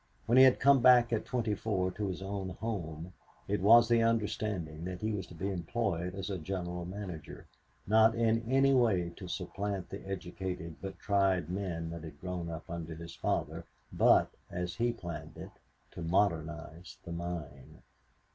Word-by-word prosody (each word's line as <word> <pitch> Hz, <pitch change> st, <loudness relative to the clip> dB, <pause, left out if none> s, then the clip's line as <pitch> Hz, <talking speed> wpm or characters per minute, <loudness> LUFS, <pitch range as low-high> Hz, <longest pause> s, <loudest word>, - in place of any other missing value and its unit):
When 120 Hz, +3 st, +5 dB
he 130 Hz, -, +10 dB
had 130 Hz, -, +5 dB
come 140 Hz, -1 st, +6 dB
back 120 Hz, -1 st, +6 dB
at 110 Hz, -, 0 dB
twenty 120 Hz, -4 st, 0 dB
four 95 Hz, -3 st, -1 dB
to 105 Hz, +2 st, -3 dB
his 95 Hz, 0 st, -4 dB
own 95 Hz, -1 st, -4 dB
home, 90 Hz, -6 st, -4 dB, 0.3 s
it 105 Hz, -1 st, 0 dB
was 115 Hz, +4 st, +7 dB
the 115 Hz, 0 st, +4 dB
understanding 105 Hz, -8 st, -1 dB
that 90 Hz, 0 st, -5 dB
he 110 Hz, +1 st, 0 dB
was 95 Hz, -4 st, -3 dB
to 90 Hz, -, -12 dB
be 95 Hz, +4 st, -2 dB
employed 90 Hz, -1 st, -2 dB
as 95 Hz, 0 st, -4 dB
a 95 Hz, -, -3 dB
general 90 Hz, 0 st, -4 dB
manager, 90 Hz, -4 st, -7 dB, 0.4 s
not 110 Hz, +2 st, +5 dB
in 115 Hz, -1 st, +2 dB
any 135 Hz, +1 st, +5 dB
way 100 Hz, -9 st, +3 dB
to 95 Hz, -, -8 dB
supplant 95 Hz, +1 st, -4 dB
the 100 Hz, -, -6 dB
educated 90 Hz, -3 st, -5 dB
but 95 Hz, 0 st, -6 dB
tried 95 Hz, -4 st, +1 dB
men 85 Hz, -4 st, -3 dB
that 85 Hz, -1 st, -6 dB
had 75 Hz, -3 st, -10 dB
grown 90 Hz, -2 st, -4 dB
up 80 Hz, +1 st, -7 dB
under 85 Hz, -1 st, -5 dB
his 85 Hz, +1 st, -9 dB
father, -, -, -2 dB, 0.3 s
but, -, -, +5 dB, 0.2 s
as 90 Hz, 0 st, -3 dB
he 120 Hz, +1 st, +1 dB
planned 85 Hz, -7 st, -7 dB
it, -, -, -8 dB, 0.4 s
to -, -, -8 dB
modernize 85 Hz, -2 st, -1 dB
the 85 Hz, -, -8 dB
mine. 85 Hz, -6 st, -6 dB
95 Hz, 175 wpm, -32 LUFS, 85-110 Hz, 0.4 s, he